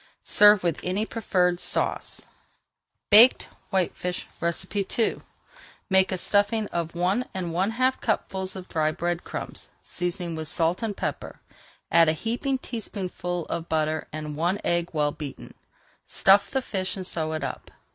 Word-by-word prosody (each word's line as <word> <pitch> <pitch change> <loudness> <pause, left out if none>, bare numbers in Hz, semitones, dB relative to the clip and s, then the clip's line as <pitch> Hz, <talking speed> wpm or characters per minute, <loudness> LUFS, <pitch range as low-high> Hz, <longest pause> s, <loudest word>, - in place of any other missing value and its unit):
Serve 210 -2 +6
with 170 -3 0
any 190 +4 -1
preferred 180 -6 0
sauce. - - -1 0.9
BAKED 230 +5 +8 0.2
WHITEFISH 180 -1 -1 0.7
II 230 - +1 0.7
Make 190 0 +4
a 185 - -1
stuffing 205 +3 +2
of 170 -1 -3
one 185 +8 +1
and 175 -3 -3
one 185 +4 +1
half 255 +3 0
cupfuls 190 -4 -2
of 185 -1 -8
dry 155 -1 0
bread 175 +2 -2
crumbs, - - -7
seasoning 175 -1 -3
with 160 -1 -5
salt 165 +4 +1
and 220 -3 -3
pepper. - - -4 0.5
Add 165 -1 +6
a - - +2
heaping 240 - -2
tablespoonful 185 -8 -5
of 170 0 -5
butter 155 0 0
and 155 -1 -5
one 175 +6 0
egg 170 0 +1
well 150 -3 +1
beaten. 145 -3 -8 0.5
Stuff 195 +1 +4
the 265 -1 -1
fish 190 -5 -3
and 185 - -5
sew 160 -3 -2
it 155 - -3
up. - - -5
180 Hz, 145 wpm, -25 LUFS, 165-205 Hz, 0.9 s, BAKED